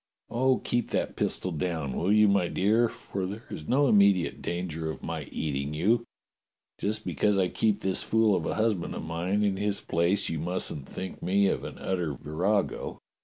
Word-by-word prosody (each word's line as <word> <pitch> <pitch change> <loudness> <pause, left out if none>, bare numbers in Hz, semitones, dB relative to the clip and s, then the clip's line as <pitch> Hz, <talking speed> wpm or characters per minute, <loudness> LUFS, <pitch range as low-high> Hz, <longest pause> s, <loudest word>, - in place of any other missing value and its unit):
"Oh, 130 +2 +3
keep 120 -1 -1
that - - -1
pistol 95 - -1
down, 80 -4 -2
will 90 +4 +1
you, 105 0 +6
my 100 -3 +3
dear? 110 +7 +2
for 95 -2 -5
there 105 +5 -7
is 75 - -7
no 140 +2 +3
immediate 100 -5 +4
danger 85 -2 -3
of 80 - -6
my - - -4
eating 70 -1 -3
you. 110 +9 +2 0.7
Just 105 +1 -2
because 105 -1 +1
I 95 -2 +2
keep 105 +1 +1
this 95 -1 0
fool 110 -2 +3
of 80 - -1
a - - -1
husband 110 -5 0
of - - -5
mine 90 +5 -1
in 100 -2 +1
his 100 0 0
place, 85 +5 +1
you 80 - -2
mustn't 80 -4 -3
think 95 - -6
me 100 +2 +3
an - - -3
utter 90 -6 -2
virago." 90 - -1
95 Hz, 180 wpm, -28 LUFS, 85-105 Hz, 0.7 s, you